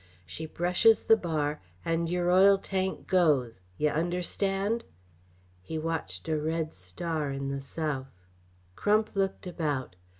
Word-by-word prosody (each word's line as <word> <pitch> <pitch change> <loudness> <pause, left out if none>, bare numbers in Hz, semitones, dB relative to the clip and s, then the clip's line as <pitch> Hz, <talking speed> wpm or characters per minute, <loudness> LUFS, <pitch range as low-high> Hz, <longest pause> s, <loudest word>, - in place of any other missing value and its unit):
She 160 - -6
brushes 180 +8 +3
the 225 - +6
bar, 155 -6 -2 0.2
and 165 0 0
yer 175 0 +1
oil 195 +2 +7
tank 190 -1 -2
goes 140 - +2 0.2
yeh 150 0 +2
understand?" 195 +6 0 0.8
He 105 - -5
watched 155 - -3
a 155 -1 +1
red 160 +1 -2
star 145 - -3
in 135 0 -3
the 140 0 -3
south. 135 -1 -3 0.7
Crump 215 +1 +2
looked 195 0 -1
about. 150 - -2
165 Hz, 130 wpm, -29 LUFS, 145-185 Hz, 0.8 s, oil